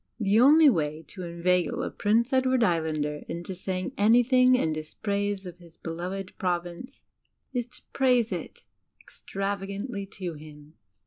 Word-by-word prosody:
The 210 0 +3
only 300 +5 +7
way 155 - +1
to 190 - -8
inveigle 175 +1 0
a - - -3
Prince 230 +5 +1
Edward 260 -1 +3
Islander 155 -5 0
into 175 +3 -5
saying 185 0 -4
anything 250 +4 +5
in 160 -11 +1
dispraise 200 +5 -3
of 180 -1 -8
his 170 -2 -18
beloved 180 +4 -5
Province 175 +4 -4 0.5
is 245 -2 -2
to 245 - -11
praise 250 -4 +3
it - - -6 0.4
extravagandy 200 +2 -5
to 185 -5 -5
him. 150 0 -13
195 Hz, 135 wpm, -27 LUFS, 170-230 Hz, 0.5 s, only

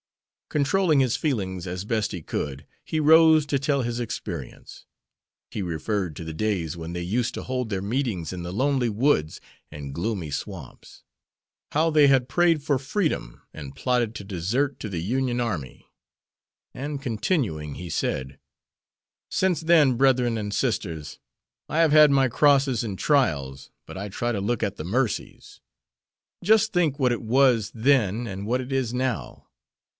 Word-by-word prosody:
Controlling 150 +2 +2
his 130 -2 +2
feelings 100 - -2
as 90 +1 -5
best 110 0 -1
he 90 -5 -5
could, 70 -2 -4 0.2
he 155 - -2
rose 160 0 +6
to 145 -2 0
tell 140 -1 0
his 120 0 -2
experience. 120 - -7 0.7
He 105 - -4
referred 90 +1 -2
to 80 - -7
the 80 - -5
days 90 -4 -1
when 85 0 -7
they 90 0 -4
used 115 +7 -1
to - - -5
hold 125 -2 -3
their 95 -2 -2
meetings 105 - -2
in 90 -1 -6
the 85 - -5
lonely 130 +3 +1
woods 105 - +1 0.3
and 70 -2 -7
gloomy 90 -1 -3
swamps. 70 - -8 0.7
How 160 +2 +2
they 150 -2 +5
had 135 -2 +3
prayed 165 +1 +2
for 145 -2 +1
freedom 135 - -2
and 70 -3 -9
plotted 125 -3 0
to 100 - -6
desert 110 - -1
to 105 - -4
the 85 -4 -3
Union 125 +5 -1
army; 90 - -4 0.9
and 140 +1 -5
continuing, 110 - -1
he 90 -1 -7
said: 65 -3 -2 0.9
"Since 180 -4 +1
then, 160 -6 +4
brethren 125 -2 +3
and 105 -1 -4
sisters, 90 - -2 0.5
I 155 - -2
have 165 -2 +4
had 150 -1 +8
my 135 -1 +4
crosses 135 -1 +3
and 100 -4 -4
trials, 70 - 0 0.2
but - - -9
I 100 +2 -5
try 120 +5 -2
to 100 - -2
look 115 +4 -1
at 100 -1 -1
the - - -5
mercies. 115 +7 -3 0.8
Just 220 +2 +4
think 160 -6 +1
what 125 -3 +3
it 120 - -4
was 120 -2 +3
then 115 -2 +2
and 100 -1 -6
what 125 +3 +1
it 130 +1 -6
is 130 -3 -1
now! 125 -2 -3
120 Hz, 160 wpm, -25 LUFS, 95-140 Hz, 0.9 s, had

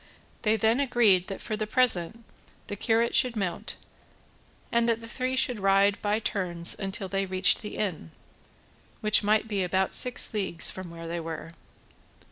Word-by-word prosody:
They 215 -1 +1
then 225 +4 +1
agreed 230 -9 +2
that 195 - -7
for 215 - -4
the 215 0 -4
present 225 -3 +4 0.4
the 205 - -6
curate 230 +3 0
should 250 -2 +2
mount, 190 -5 -4 1.0
and 235 0 +1
that 230 -1 0
the 230 - -11
three 255 +2 -3
should 250 -3 +1
ride 195 +1 +2
by 210 0 0
turns 180 -6 0
until 195 0 -5
they 195 +1 -3
reached 185 +1 +2
the 210 - -8
inn, 180 - -4 0.9
which 215 0 +3
might 215 +1 +1
be 205 -3 -2
about 190 +1 -1
six 250 -2 +4
leagues 190 -5 +1
from 185 -2 -8
where 165 0 -10
they 170 +1 -4
were. 165 0 -7
205 Hz, 165 wpm, -26 LUFS, 185-225 Hz, 1.0 s, present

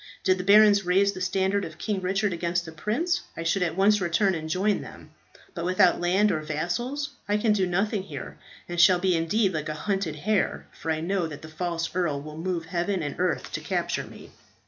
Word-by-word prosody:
Did 185 0 +2
the - - -2
barons 205 0 +6
raise 190 +3 +3
the 185 - -8
standard 190 +2 0
of 160 -2 -7
King 200 +1 -2
Richard 195 +1 0
against 170 +1 -1
the 160 - -8
prince, 240 - -1 0.2
I 165 - -3
should 170 +3 +1
at 175 -1 -1
once 205 +1 +4
return 185 +3 +2
and 160 -2 -4
join 195 +5 +1
them. - - -12 0.4
But 170 - -5
without 185 0 +3
land 190 +4 +3
or 155 - 0
vassals, 175 - -3 0.2
I 205 - +3
can 210 0 +2
do 190 -3 +1
nothing 200 +3 0
here, 150 -8 -8 0.3
and 175 0 +1
shall 180 0 +7
be 180 0 +1
indeed 190 +5 +1
like 155 -1 -3
a 155 - -3
hunted 195 -2 -2
hare, 200 +6 0
for 160 - -7
I 155 0 0
know 180 0 0
that 150 -1 -9
the 155 - -9
false 170 0 -2
earl 165 -6 0
will 150 +1 -9
move 170 -1 -2
heaven 175 +1 -1
and 145 -2 -3
earth 180 -2 -1
to - - -4
capture - - -2
me." - - -13
180 Hz, 215 wpm, -26 LUFS, 165-200 Hz, 0.4 s, shall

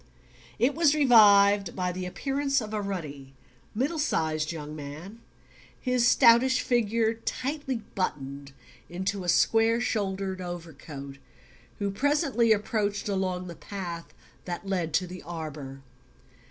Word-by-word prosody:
It 255 +4 +2
was 310 -2 +3
revived 205 - +6
by 180 -1 -1
the 180 0 -5
appearance 275 +7 -1
of 220 -2 -6
a 210 - -1
ruddy 145 -9 -6 0.4
middle 285 +8 -1
sized 155 - 0
young 150 -2 -7
man, 155 +10 -9 0.6
his 250 -1 +2
stoutish 250 +1 +5
figure 230 -2 +1
tightly 260 +1 -4
buttoned 140 -6 -4 0.4
into 190 +2 -3
a 175 - -2
square 225 +5 +3
shouldered 195 -5 -2
over 175 -2 -6
coat, 140 -1 -9 0.6
who 200 -1 -2
presently 275 - +2
approached 205 -1 0
along 185 -2 -1
the 175 - -7
path 170 -1 -7 0.3
that 175 +2 -5
led 180 -4 -1
to 185 - +2
the 180 0 -9
arbour. 150 -5 -7
195 Hz, 125 wpm, -27 LUFS, 170-230 Hz, 0.6 s, revived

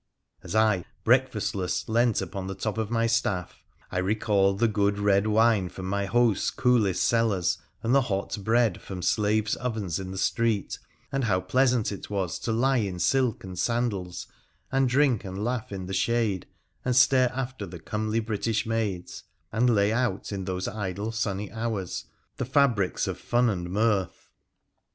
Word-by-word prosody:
As - - -6
I, 110 -5 +3 0.2
breakfastless, 110 -7 +1
lent 115 0 +2
upon 95 -1 -5
the 95 - -4
top 110 +2 -3
of 110 -2 -2
my 115 -1 +1
staff, 115 -6 -1 0.3
I 90 - -1
recalled 100 0 +2
the 115 - +3
good 100 -1 +1
red 100 0 +2
wine 110 -3 +3
from 95 - -8
my 100 +1 -1
host's 120 -1 +2
coolest 110 -8 +2
cellars 110 -7 +1 0.2
and 115 +2 +1
the 140 - +6
hot 95 -4 -2
bread 115 -2 +2
from 90 -2 -7
slaves' 105 0 +1
ovens 110 -8 -2
in 95 -1 -6
the 95 - -6
street, 110 +1 0 0.3
and 135 -2 0
how 95 -4 +2
pleasant 125 +4 +2
it 100 - -7
was 95 -4 -2
to 115 - -2
lie 130 +4 +2
in 100 -6 -1
silk 125 +5 +1
and 95 -2 -7
sandals, 105 -6 -1 0.5
and 135 -1 +2
drink 130 -3 +3
and 95 +1 -5
laugh 120 -2 -2
in 95 -2 -5
the 95 - -5
shade 110 -3 0 0.4
and 125 -1 0
stare 130 -1 +5
after 130 -4 -4
the 90 0 -8
comely 110 +6 -2
British 110 0 -1
maids, 110 -6 -3 0.3
and 120 +3 +2
lay 105 -2 +3
out 115 -5 -1
in 95 -2 -4
those 95 0 -3
idle 100 +1 -3
sunny 105 -3 -2
hours 110 -5 -3 0.3
the - - -2
fabrics 125 -8 +2
of - - -4
fun 120 -1 +2
and 90 -3 -4
mirth. 100 -1 0
110 Hz, 170 wpm, -27 LUFS, 95-120 Hz, 0.5 s, the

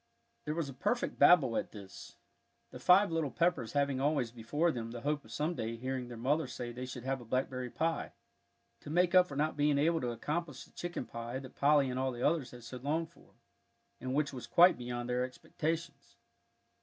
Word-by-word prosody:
There 150 - -2
was 165 -3 -1
a 135 - -7
perfect 240 - -1
babel 135 -10 +6
at - - -2
this, 100 -3 -11 0.6
the - - -9
five 190 +1 +5
little 165 -3 0
Peppers 165 -7 0
having 140 -2 +1
always 140 -5 +1
before 145 +9 0
them 115 -4 -5
the 120 0 -7
hope 145 +2 -1
of 110 - -15
some 150 +7 -1
day 115 -7 -3
hearing 130 +1 -3
their 120 -1 -8
mother 140 +6 +1
say 120 -1 -5
they 125 +2 -6
should 125 -1 -7
have 135 0 -2
a - - -9
blackberry 130 +1 -2
pie 165 +5 -2 0.7
to - - -11
make 175 +2 +2
up 180 -1 +7
for 140 - -8
not 155 +2 0
being 145 0 +2
able 160 +3 +2
to 125 - -1
accomplish 150 +5 -3
the - - -23
chicken 175 -7 -5
pie 115 +2 -5
that 130 -1 -9
Polly 145 -1 +4
and 130 0 -2
all 130 0 0
the 120 0 -5
others 150 -5 0
had 120 0 -12
so 125 +2 -7
longed 155 +6 -2
for - - -22 0.6
and 130 +1 -3
which 145 -1 +1
was 125 - -7
quite 175 +2 +7
beyond 120 0 -4
their 125 0 0
expectations. 155 +6 -4
135 Hz, 210 wpm, -33 LUFS, 125-155 Hz, 0.7 s, up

